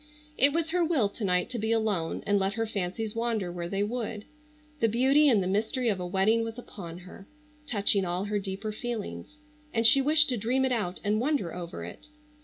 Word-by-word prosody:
It 280 0 +5
was 325 +1 -1
her 355 0 +2
will 300 -11 +2
to 210 - -8
night 180 -2 +2
to 240 - -3
be 220 +1 -1
alone 210 -7 0
and 205 -1 +2
let 195 +1 0
her 225 +2 -1
fancies 210 +1 -3
wander 230 -5 -1
where 175 -1 -5
they 195 +2 0
would. 220 -1 -4 0.5
The 230 - +3
beauty 270 +6 +4
and 215 -7 +3
the - - -2
mystery 220 +5 0
of 200 -3 -1
a 180 - -4
wedding 200 +5 +2
was 225 +1 -6
upon 175 -8 -9
her, 185 +2 -13 0.4
touching 200 -4 +3
all 180 +2 -2
her 205 0 -1
deeper 200 +2 -4
feelings, 240 +6 -6 0.3
and 225 0 0
she 275 +4 +7
wished 300 +2 +4
to 250 - 0
dream 250 +5 +1
it 260 - 0
out 205 -7 -2
and 210 +1 +1
wonder 265 - -1
over 170 - -7
it. 85 - -11
215 Hz, 210 wpm, -28 LUFS, 195-245 Hz, 0.5 s, she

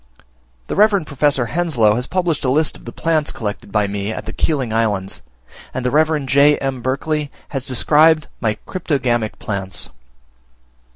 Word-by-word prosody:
The - - -4
Reverend 200 -4 +4
Professor 140 -2 +1
Henslow 130 -9 +2
has 125 +3 -2
published 175 -5 0
a 130 - +1
list 150 +4 +2
of - - -13
the 120 - -6
plants 160 0 0
collected 105 -2 -5
by 105 -1 +2
me 100 +1 -3
at - - -6
the - - -6
Keeling 135 -8 -1
Islands; 105 - -1 0.5
and 130 - -3
the 125 - +1
Reverend 155 -2 +2
J. 140 +2 +5
M. 135 -2 -3
Berkeley 145 +4 -1 0.2
has 135 -2 -4
described 155 +4 +4
my 110 -3 0
cryptogamic 125 - -1
plants. 100 -3 -4
135 Hz, 160 wpm, -19 LUFS, 115-155 Hz, 0.5 s, J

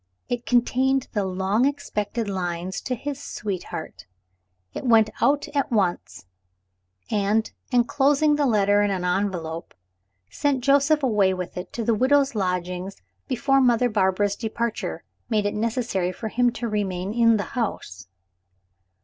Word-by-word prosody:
It 240 -2 -3
contained 255 +3 +2
the 205 - 0
long 190 +5 +1
expected 230 -6 -2
lines 180 -1 -3
to 255 - -1
his 285 +3 -6
sweetheart. 185 - -6 0.7
I - - -3
went 225 -4 +4
out 285 +1 +2
at 280 -1 -1
once, 190 - -1 0.9
and, 210 +2 +1 0.2
enclosing 280 +5 +3
the 290 -1 +1
letter 205 -3 +3
in 205 - +2
an 185 -2 -2
envelope, 180 -3 -2 0.6
sent 270 - 0
Joseph 285 +2 +3
away 205 -7 +3
with 180 -1 -6
it 180 - -6
to 235 - -3
the 230 - +2
widow's 270 +4 +3
lodgings 180 -1 -2 0.3
before 270 +1 +2
Mother 245 -1 +3
Barbara's 200 -1 +1
departure 230 0 -3 0.3
made 215 -3 +1
it 205 - 0
necessary 220 -5 -1
for 220 +4 -6
him 245 +2 +2
to 240 - -4
remain 200 -2 -2
in 230 -1 +4
the 205 - -1
house. 150 - -4
220 Hz, 140 wpm, -24 LUFS, 190-250 Hz, 0.9 s, went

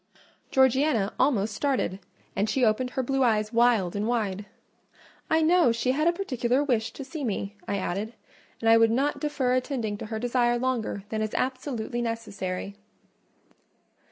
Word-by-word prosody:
Georgiana 260 -5 +3
almost 220 -6 +2
started, 240 -7 -1 0.4
and 205 +2 0
she 250 +3 +2
opened 230 +4 +1
her 260 +1 -2
blue 270 +2 0
eyes 215 -3 +2
wild 230 -6 +3
and 205 +2 -1
wide. 210 -4 -1 0.8
"I 320 0 +3
know 335 -4 +5
she 235 +2 0
had 305 +5 +1
a - - +6
particular 265 -7 0
wish 230 -5 0
to 275 - -7
see 295 +2 -6
me," 205 -3 -3
I 200 - -1
added, 200 +4 -3 0.4
"and 225 - -2
I 225 0 +7
would 225 0 +5
not 270 +6 0
defer 275 -4 0
attending 245 -5 -2
to - - -6
her 220 0 -4
desire 240 +1 +1
longer 240 -5 -2
than 220 -1 -2
is 215 -1 -3
absolutely 255 -2 -2
necessary." 200 -5 -4
240 Hz, 160 wpm, -27 LUFS, 215-265 Hz, 0.8 s, I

